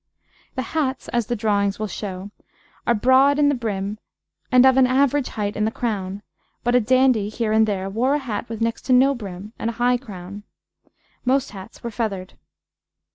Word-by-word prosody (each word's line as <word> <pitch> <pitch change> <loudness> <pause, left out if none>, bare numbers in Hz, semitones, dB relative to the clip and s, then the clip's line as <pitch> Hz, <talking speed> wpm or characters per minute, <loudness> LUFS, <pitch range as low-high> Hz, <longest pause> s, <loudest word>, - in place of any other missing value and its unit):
The 260 - -2
hats, 275 -4 -1
as 235 -3 0
the 240 - -1
drawings 205 -2 +1
will 215 - -2
show, 195 -1 -6 0.6
are 235 - +4
broad 260 +5 +4
in 290 -1 +4
the - - +2
brim 210 -4 -3 0.5
and 255 0 +6
of 260 -1 +6
an 265 -1 +5
average 275 +1 +2
height 210 -1 -3
in 210 - 0
the 215 - +2
crown, 205 -4 -3 0.4
but 240 - +1
a 250 - +6
dandy, 250 -3 +3
here 220 0 -2
and 220 0 +4
there, 195 -2 -2
wore 240 +8 +1
a - - +2
hat 240 -5 -4
with 225 -1 -6
next 230 0 -1
to 255 - +4
no 265 +2 +5
brim 205 -3 -8
and 225 - -1
a - - -4
high 245 +2 +2
crown. 200 -4 -9 0.8
Most 265 +2 +1
hats 195 +2 -11
were 235 - -4
feathered. 200 -5 -3
230 Hz, 190 wpm, -22 LUFS, 205-255 Hz, 0.8 s, and